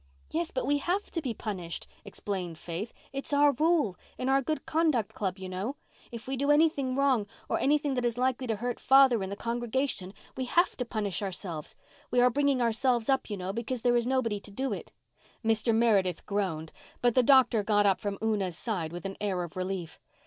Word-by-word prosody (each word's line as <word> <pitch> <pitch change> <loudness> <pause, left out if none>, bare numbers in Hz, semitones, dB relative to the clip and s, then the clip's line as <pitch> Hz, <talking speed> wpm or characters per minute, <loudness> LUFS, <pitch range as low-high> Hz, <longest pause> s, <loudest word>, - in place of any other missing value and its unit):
"Yes, 335 +1 -1
but 260 - -2
we 290 0 +2
had 365 +7 0
to 335 - -4
be 250 -6 -3
punished," 180 -7 -5 0.2
explained 180 -5 -4
Faith. 175 +8 -5 0.2
"It's 275 +1 -2
our 290 0 +6
rule—in 280 - 0
our 270 0 +4
Good 310 +4 -3
Conduct 310 -9 +1
Club, 190 -2 -2
you 190 -1 -7
know—if 225 +4 -7
we 270 - -1
do 280 +2 -1
anything 295 -4 +3
wrong, 265 -6 +2 0.2
or - - 0
anything 290 0 +2
that 250 -1 -1
is 240 -1 0
likely 255 0 0
to 225 - 0
hurt 240 +3 -3
father 265 -4 +6
in 190 - -3
the 200 - -4
congregation, 235 -3 -2 0.2
we 260 - -2
have 345 +8 +2
to 250 - -2
punish 215 -5 -2
ourselves. 180 -5 -5 0.3
We 245 - +2
are 250 0 +5
bringing 280 -1 +2
ourselves 235 +1 +1
up, 265 -2 +1
you 205 - -3
know, 185 +1 -4
because 235 +2 -3
there 245 -1 +4
is 240 0 +1
nobody 240 -5 0
to 205 - -13
do 265 +7 -2
it." - - -7 0.5
Mr. 225 +1 +2
Meredith 205 -6 +2
groaned, 185 -6 -2 0.3
but 245 -1 +4
the 255 - +5
doctor 255 -3 +5
got 205 0 +2
up 195 -2 +3
from 200 -1 -3
Una's 200 -6 0
side 180 -9 -3
with 175 +2 -7
an 195 0 -5
air 190 -4 0
of 170 - -8
relief. 185 -3 -4
235 Hz, 200 wpm, -29 LUFS, 195-265 Hz, 0.5 s, our